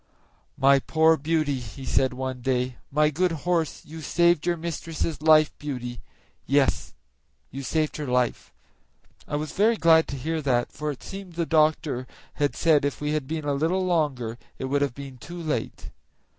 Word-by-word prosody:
"My 135 +1 +5
poor 160 +3 +3
Beauty," 155 -2 0
he 125 +3 -9
said 130 0 +2
one 130 0 -4
day, 125 0 -1
"my 150 +2 +3
good 180 +4 +1
horse, 170 -3 0
you 160 +1 -9
saved 170 +1 +2
your 175 -1 +1
mistress' 165 -1 -4
life, 155 -1 +5
Beauty; 125 -4 -5 0.5
yes, 140 0 +1 0.6
you 135 - -6
saved 155 +3 -1
her 150 -2 -4
life." 125 -1 0 0.8
I - - -3
was 150 +1 -3
very 220 +3 +3
glad 160 -2 +5
to - - -5
hear 160 +4 -2
that, 125 -4 +1
for 150 +1 -4
it 145 - -6
seems 195 -3 -8
the 170 0 0
doctor 155 -5 +1 0.3
had 145 - +1
said 155 -4 +3
if 145 - -1
we 150 0 -2
had 150 -4 -2
been 155 0 -3
a 145 - +1
little 165 +6 0
longer 135 -10 0 0.2
it - - -4
would 140 +2 0
have 140 -4 0
been 135 -2 -9
too 175 +6 -8
late. 155 -3 -4
150 Hz, 175 wpm, -25 LUFS, 135-160 Hz, 0.8 s, My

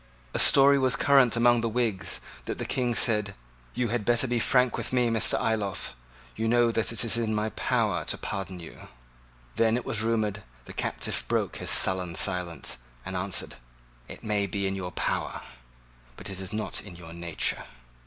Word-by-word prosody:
A - - 0
story 140 0 +7
was 130 -2 +4
current 135 -2 +4
among 120 0 +4
the 115 - -1
Whigs 110 -4 -1 0.2
that - - -4
the - - -4
King 120 -2 -1
said, 105 -4 +2 0.4
"You 120 -1 0
had 120 -1 -1
better 120 +3 +2
be 120 -1 0
frank 125 +1 +3
with - - -4
me, 125 -2 +2
Mr. 115 -1 +3
Ayloffe. 105 - -2 0.4
You 110 +1 -1
know 120 0 +3
that 115 0 0
it 115 0 0
is 115 0 +1
in 110 -2 -1
my 105 +1 0
power - - 0
to - - 0
pardon 95 -2 -5
you." 85 - -11 0.7
Then, 115 +1 +3
it 125 - -5
was 110 - -1
rumoured, 110 -2 0 0.2
the - - -10
captive - - -1
broke - - -1
his - - -4
sullen 90 -2 +3
silence, 90 -10 -1 0.3
and 95 - -5
answered, 95 -5 -1 0.5
"It - - -10
may 105 -2 0
be 100 +1 -2
in 95 0 -1
your 90 -2 -5
power; - - -2 0.8
but - - -6
it 95 - -5
is 95 0 -6
not 110 0 -1
in 95 -4 -11
your 85 -1 -11
nature." 85 -1 -2
110 Hz, 185 wpm, -27 LUFS, 95-120 Hz, 0.8 s, story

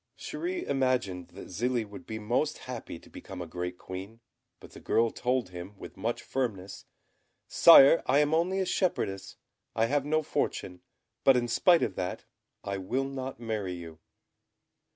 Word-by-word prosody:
Chéri 350 +1 -4
imagined 125 -10 0
that - - -11
Zélie 120 +3 -1
would 100 - -11
be 110 - -4
most 120 +8 0
happy 125 -8 -6
to - - -18
become 95 -1 -10
a 90 - -4
great 90 +2 -5
Queen; 95 +6 -8 0.4
but - - -14
the - - -12
girl 115 0 +2
told 125 -5 -1
him, 90 +3 -9
with - - -10
much 115 +5 -3
firmness, 105 -8 -4 0.6
"Sire, 165 -1 +8
I 130 - +4
am 150 +1 +3
only 180 +4 +1
a 190 - +1
shepherdess; 135 - -1 0.4
I 115 - +3
have 140 +3 +1
no 155 +2 +1
fortune; 90 -9 -2 0.4
but 135 -2 +6
in 120 -1 0
spite 170 +8 +4
of - - -1
that, 90 0 -4 0.4
I 100 0 -3
will 120 +8 -1
not 130 -2 -6
marry 110 -5 -3
you." 85 -2 -9
115 Hz, 165 wpm, -29 LUFS, 95-135 Hz, 0.6 s, Sire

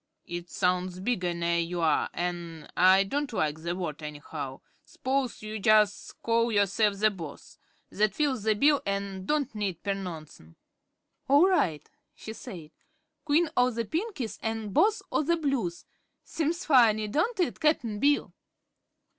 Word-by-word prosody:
It 175 0 -6
sounds 180 0 0
bigger 185 -4 -1
ner 170 0 0
you 170 +1 -2
are, 160 -2 +2
an' 170 -3 -4
I 190 +2 +6
don't 280 +7 -2
like 155 -7 -1
the 170 +1 -2
word, 165 -4 -4
anyhow. 145 -2 -7 0.2
S'pose 260 -3 -2
you 215 0 -5
jus' 210 0 +3
call 230 0 +2
yourself 205 0 +2
the 215 +1 +3
Boss? 165 -7 -10 0.3
That 210 0 +1
fills 280 -6 0
the 215 +1 +2
bill 285 +5 +4
an' 200 -1 -3
don't 290 -4 0
need 200 -5 -3
pernouncin'." 165 - -6 0.7
"All 285 +7 +6
right," 165 - +1 0.3
she 220 - -8
said; 175 -10 -9 0.5
"Queen 310 +2 +2
o' 250 0 +4
the 230 -1 -3
Pinkies 305 - -4
an' 220 -1 -3
Boss 410 - +2
o' - - +2
the 335 +3 +1
Blues. 270 - -2 0.4
Seems 330 +3 -2
funny, 225 -7 +4
don't 330 - 0
it, 355 - 0
Cap'n 245 -9 +1
Bill?" 285 +4 +2
210 Hz, 145 wpm, -28 LUFS, 175-270 Hz, 0.7 s, I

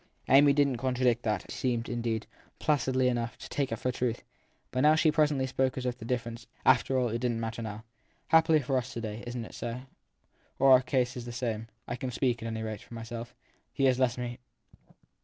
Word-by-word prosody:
Amy 140 +2 +7
didn 140 -1 +3
t - - -3
contradict 125 -2 +1
that 105 -4 -2
seemed 125 -2 -1
indeed, 115 -2 -2 0.3
placidly 130 -3 +1
enough, 120 -2 -1
to - - -9
take 140 -4 -2
it - - 0
for 125 +3 -1
truth; 120 -1 -2 0.5
but 150 +5 +4
she 155 0 +4
presently 150 -3 +2
spoke 130 0 0
as 130 - -3
if 125 -1 -1
the 115 - -10
differ 120 -1 -1
ence, 115 +1 -10 0.2
after 130 +1 +4
all, 125 -2 +2
didn 120 +2 -1
t 115 - -3
matter 115 0 -4
now. 110 0 -6 0.5
Happily 160 -1 +5
for 135 0 0
us 125 +1 -7
to 115 - -4
day 110 0 -5
isn 120 -1 -4
t - - -9
it - - -16
so? 120 +1 -5 0.8
our 130 -1 +7
case 125 -2 0
is 120 -1 -6
the 120 - -6
same. 115 -2 -3 0.2
I 120 - -3
can 130 +1 -3
speak, 120 -1 0
at 115 - -4
any 110 -1 -3
rate, 110 -2 -5
for 120 - -12
myself. 115 +1 -7 0.4
He 135 - -2
has 130 -1 +3
left 125 -2 +2
me. 120 0 -4
125 Hz, 215 wpm, -29 LUFS, 115-130 Hz, 0.8 s, Amy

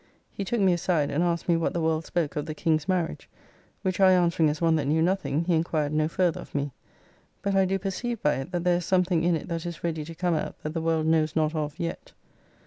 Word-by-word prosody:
He 200 - -4
took 235 +5 -1
me 190 -3 +4
aside, 170 -4 0
and 160 +4 +1
asked 170 -1 -1
me 170 - +4
what 165 - 0
the 170 - -1
world 160 0 0
spoke 170 -4 -1
of 150 - -3
the 155 - -4
King's 155 +1 0
marriage. 180 -3 -1 0.5
Which 185 -2 -1
I 190 -1 +7
answering 170 -3 +3
as 150 +1 -3
one 165 -1 +3
that 145 -3 -1
knew 155 +3 +2
nothing, 170 -4 0
he 180 - +1
enquired 160 -2 0
no 155 0 +2
further 175 0 0
of - - -13
me. 145 0 -1 0.7
But 200 - 0
I 195 0 +4
do 190 +1 0
perceive 205 +5 -3
by 150 -6 +1
it 135 +7 -6
that 175 -2 -2
there 180 -1 +3
is 175 - -4
something 180 -3 +2
in 175 0 +3
it 155 - -5
that 165 -1 -3
is 170 -2 -6
ready 160 -2 -2
to 165 +1 -9
come 175 0 0
out 155 - -3
that 155 - -4
the 165 - -2
world 160 -1 +1
knows 160 -1 +2
not 155 -1 +1
of 150 -2 -3
yet. 170 0 -5
165 Hz, 255 wpm, -26 LUFS, 155-180 Hz, 0.7 s, I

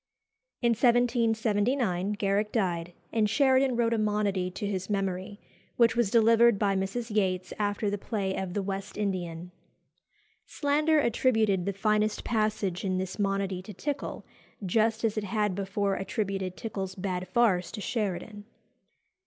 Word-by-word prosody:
In 235 - +4
1779 230 -4 +2
Garrick 205 +1 0
died, 175 -5 -1 0.2
and 220 -2 +2
Sheridan 265 0 +3
wrote 235 -1 +2
a 225 - +1
monody 205 -3 0
to 190 +3 -5
his 190 -1 -3
memory, 195 0 -2 0.4
which 230 -1 +4
was 235 -4 +2
delivered 230 0 +5
by 200 -1 +1
Mrs. 210 +4 -3
Yates 185 -3 0
after 205 0 0
the 205 0 -1
play 195 -3 -2
of 190 -2 -4
"The 205 - 0
West 195 +1 -5
Indian." 180 -4 -3 1.0
Slander 300 +2 +2
attributed 220 -7 +2
the - - +2
finest 210 +2 +1
passage 215 -5 -1
in 185 -2 0
this 190 +2 -4
monody 195 -2 -1
to 195 +1 -10
Tickell, 290 - -4 0.4
just 220 +4 +1
as 215 -1 0
it - - -6
had 210 0 0
before 200 +1 -1
attributed 195 -1 -3
Tickell's 195 -4 -5
bad 185 -1 -3
farce 205 -8 +2
to 220 - -6
Sheridan. 210 -1 -3
205 Hz, 145 wpm, -28 LUFS, 190-225 Hz, 1.0 s, delivered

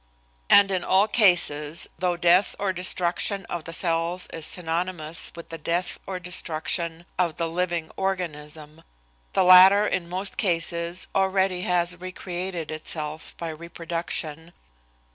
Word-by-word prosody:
And 200 -1 +6
in 185 -2 -1
all 195 +3 +3
cases, 170 -8 +2
though 180 -1 0
death 175 +3 +3
or 195 -2 -1
destruction 180 +1 0
of 170 -2 -6
the 165 - -7
cells 170 +1 0
is 160 -2 0
synonymous 170 -1 -2
with 170 - -10
the 165 - -7
death 175 +3 -2
or 190 - -4
destruction 170 -1 -1
of 170 -4 0
the 165 - -1
living 170 -1 -2
organism, 155 -5 -4 0.5
the 190 - +3
latter 185 +3 +8
in 180 -4 -2
most 190 +2 -2
cases 170 -1 -1
already 190 -1 +1
has 175 0 +2
recreated 180 -2 -5
itself 155 0 -3
by 170 - -5
reproduction. 165 0 -4
175 Hz, 130 wpm, -25 LUFS, 165-185 Hz, 0.5 s, latter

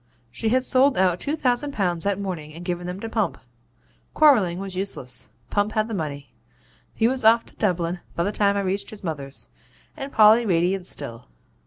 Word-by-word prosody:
She 220 - -2
had 255 +2 +2
sold 265 +1 +3
out 180 -2 +2
two 290 - -1
thousand 280 0 0
pounds 175 -6 -1
that 200 -1 0
morning 165 -6 -5
and 175 +1 -9
given 175 -1 -3
them 180 +2 -5
to 225 - -4
Pump. 225 - -1 0.8
Quarrelling 215 - +5
was 190 -1 -5
useless 130 -10 -2 0.2
Pump 205 +1 0
had 215 0 +1
the 225 - -5
money; 145 - -5 0.6
he 225 - +3
was 260 0 -1
off 230 +1 +5
to - - -16
Dublin 180 -3 0 0.2
by 170 - 0
the 205 - 0
time 200 -1 +2
I - - +1
reached 195 +1 -2
his 215 -2 -10
mother's, 140 -5 -6 0.5
and 275 -2 -6
Polly 220 +1 +6
radiant 180 -1 +1
still. 115 -9 -6
195 Hz, 190 wpm, -24 LUFS, 175-225 Hz, 0.8 s, Polly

